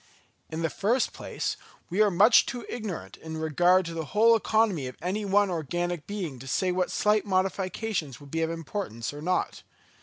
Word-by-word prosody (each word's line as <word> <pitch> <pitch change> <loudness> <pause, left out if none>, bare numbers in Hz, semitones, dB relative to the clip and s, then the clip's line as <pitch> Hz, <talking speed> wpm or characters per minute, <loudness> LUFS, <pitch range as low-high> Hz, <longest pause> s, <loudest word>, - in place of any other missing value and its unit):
In 160 +1 -4
the 165 - 0
first 230 +5 +1
place, - - -4 0.3
we 195 +4 +2
are 210 - +5
much 205 +6 +6
too 245 -1 -5
ignorant 215 -8 -6
in 160 0 -7
regard 175 +4 +3
to 165 - -5
the 165 -1 -3
whole 230 +2 +7
economy 215 - +1
of 125 - -9
any 195 +4 -2
one 200 0 +3
organic 175 0 -2
being 180 -11 -4
to 135 - -10
say 185 +7 +1
what 180 0 0
slight 210 0 +2
modifications 185 - -1
would 145 -1 -14
be 165 - -1
of 160 - +1
importance 165 - -4
or 145 - -8
not. 180 +3 -1
180 Hz, 185 wpm, -27 LUFS, 160-205 Hz, 0.3 s, whole